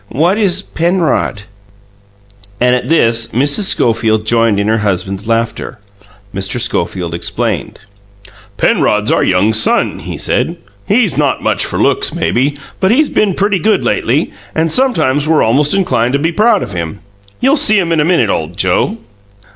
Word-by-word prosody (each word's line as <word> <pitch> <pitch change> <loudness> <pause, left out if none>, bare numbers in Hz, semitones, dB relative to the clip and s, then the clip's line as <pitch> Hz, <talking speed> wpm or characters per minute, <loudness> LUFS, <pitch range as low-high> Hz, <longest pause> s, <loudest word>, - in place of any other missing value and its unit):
"What 170 - +1
is 195 -2 +1
Penrod?" 170 - -1 1.2
And 125 0 +3
at 125 +1 -4
this, 115 -8 +2
Mrs. 140 - +1
Schofield 110 - +1
joined 115 -2 +2
in 100 - -1
her 110 +1 +1
husband's 95 0 -2
laughter. 115 +2 -2 0.6
Mr. 100 +5 -3
Schofield 90 -7 -2
explained. 85 - -3 0.8
"Penrod's 105 0 +1
our - - +2
young 95 +4 +2
son," 110 +1 +1
he - - -7
said. - - -1 0.3
"He's 210 -2 +1
not 145 -3 0
much - - +1
for - - -2
looks, - - +1
maybe; 140 +4 0 0.2
but 190 - +2
he's 285 +7 +2
been 200 -4 +1
pretty 200 -1 0
good 215 +4 +1
lately, - - 0 0.2
and 160 0 0
sometimes 155 - +1
we're 160 -1 +3
almost 145 +9 +2
inclined 155 -11 0
to - - +3
be 165 +3 0
proud 215 +3 +2
of - - -7
him. 85 +2 -4 0.4
You'll 270 +3 +3
see 215 -7 +4
him 175 -4 0
in 165 - +1
a - - +3
minute, 160 - +2
old 80 +2 -4
Joe!" 95 - +1
135 Hz, 160 wpm, -13 LUFS, 110-185 Hz, 1.2 s, see